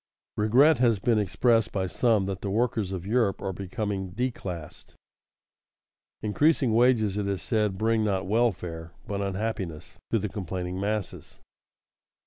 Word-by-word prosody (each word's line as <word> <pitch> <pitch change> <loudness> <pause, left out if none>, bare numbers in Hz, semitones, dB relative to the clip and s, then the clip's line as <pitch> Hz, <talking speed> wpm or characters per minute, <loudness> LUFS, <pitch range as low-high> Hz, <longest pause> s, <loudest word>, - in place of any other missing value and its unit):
Regret 125 +7 +4
has 120 -4 +4
been 110 +2 +2
expressed 115 +3 +2
by 95 -2 -1
some 110 +1 +2
that 95 -2 -4
the 100 - -3
workers 110 -2 0
of 95 -2 -5
Europe 110 -2 +1
are 95 -1 -3
becoming 100 -1 -4
"declassed." 95 -9 -5 1.3
Increasing 130 +3 +2
wages, 115 -4 +3
it 105 -1 -1
is 100 -2 -2
said, 105 -4 0
bring 110 +1 +1
not 95 -3 0
welfare, 90 -7 -1
but 100 -1 -3
unhappiness, 95 -5 -4
to - - +2
the - - -2
complaining 90 -1 -4
masses. 105 0 -4
105 Hz, 135 wpm, -27 LUFS, 95-115 Hz, 1.3 s, Regret